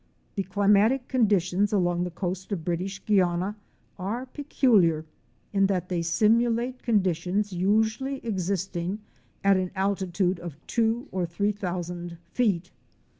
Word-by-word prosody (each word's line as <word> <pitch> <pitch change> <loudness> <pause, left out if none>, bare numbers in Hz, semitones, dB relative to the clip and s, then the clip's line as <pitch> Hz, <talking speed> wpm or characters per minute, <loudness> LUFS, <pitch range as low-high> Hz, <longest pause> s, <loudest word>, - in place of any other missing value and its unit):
The 200 - -1
climatic 205 +6 +3
conditions 205 -5 +2
along 175 -3 +1
the - - -3
coast 185 +2 -4
of 170 -6 -3
British 185 +3 -3
Guiana 185 -1 +2 0.4
are 220 +7 -3
peculiar, 220 - +2 0.5
in 195 -1 +4
that 180 -2 -1
they 175 -2 0
simulate 230 +8 +2
conditions 195 -1 0
usually 220 +8 +1
existing 190 -1 -2 0.4
at 195 -1 +5
an 185 -1 -1
altitude 190 -2 0
of 170 -4 -7
two 230 +1 0
or 180 -2 -1
three 200 +5 0
thousand 175 -3 -5
feet. 195 -8 0
195 Hz, 125 wpm, -26 LUFS, 175-215 Hz, 0.5 s, at